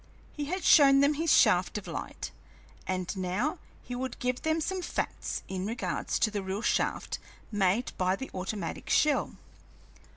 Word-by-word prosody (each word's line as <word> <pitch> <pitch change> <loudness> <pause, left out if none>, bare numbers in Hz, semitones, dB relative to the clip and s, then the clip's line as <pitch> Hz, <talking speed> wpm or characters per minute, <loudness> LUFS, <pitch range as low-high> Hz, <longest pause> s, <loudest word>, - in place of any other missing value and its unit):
He 295 - -3
had 365 +5 -3
shown 275 -3 +7
them 285 +2 +4
his 320 +1 +1
shaft 210 -2 +4
of 210 - -6
light, - - -5 0.6
and 185 0 -2
now 190 - -1 0.2
he 250 - -7
would 255 0 -4
give 250 0 -1
them 315 +1 +1
some 375 +4 -2
facts 345 - -3
in 190 +1 -3
regard 230 +2 -3
to 215 - +1
the 205 -1 -2
real 190 +3 -4
shaft - - 0 0.3
made 205 +3 +1
by 185 0 +2
the 265 +7 -7
automatic 190 +3 -4
shell. 300 -2 +2
235 Hz, 160 wpm, -29 LUFS, 190-290 Hz, 0.6 s, shown